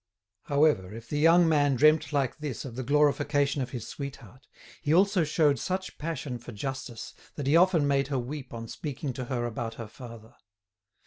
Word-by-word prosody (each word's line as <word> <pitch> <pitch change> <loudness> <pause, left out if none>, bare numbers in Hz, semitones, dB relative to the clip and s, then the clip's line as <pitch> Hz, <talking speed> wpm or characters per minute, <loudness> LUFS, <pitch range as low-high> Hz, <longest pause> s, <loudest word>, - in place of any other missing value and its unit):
However, 140 -10 +2
if 115 0 -10
the 145 - -1
young 165 +2 +6
man 145 -3 +3
dreamt 155 +2 +4
like 140 -1 -1
this 145 -5 -5
of 120 -4 -7
the 130 - -3
glorification 145 +1 +2
of 130 - -3
his 120 -4 -6
sweetheart, 135 -2 -9 0.3
he 150 - -1
also 195 -1 +4
showed 150 -3 +2
such 185 +5 -4
passion 150 -5 -4
for 120 - -10
justice 120 0 -6 0.2
that 145 - -4
he 140 +4 +3
often 170 -4 +4
made 140 -1 +2
her 140 -2 -1
weep 130 +2 -5
on 115 -1 -7
speaking 140 +1 -5
to 130 0 -5
her 120 -1 -2
about 115 -1 -4
her 115 -2 -7
father. 115 -1 -12
140 Hz, 185 wpm, -28 LUFS, 120-150 Hz, 0.3 s, young